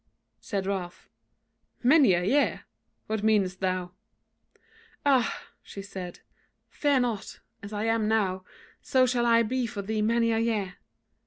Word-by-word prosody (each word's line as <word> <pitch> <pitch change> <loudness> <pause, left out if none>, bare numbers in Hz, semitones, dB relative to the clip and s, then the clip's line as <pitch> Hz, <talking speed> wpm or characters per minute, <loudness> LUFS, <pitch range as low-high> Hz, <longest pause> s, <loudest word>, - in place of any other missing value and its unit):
Said 195 -2 -3
Ralph: 190 -3 -5 0.7
"Many 265 - +6
a 175 0 +1
year! 280 +10 +1 0.4
what 220 -1 -2
meanest 205 -4 +2
thou?" 185 -1 -2 1.1
"Ah!" 265 -5 +2 0.2
she 200 - -9
said, 185 -3 -8 0.5
"fear 285 -3 +2
not! 235 -5 -3 0.2
as 200 +1 -9
I 210 0 -3
am 225 -1 +1
now, 195 -4 0 0.4
so 260 -1 +3
shall 240 -1 +1
I 230 0 +5
be 250 +2 -1
for 215 -3 -5
thee 215 +2 -2
many 230 +1 +2
a 225 - +1
year. 215 -5 -1
220 Hz, 140 wpm, -27 LUFS, 195-235 Hz, 1.1 s, Many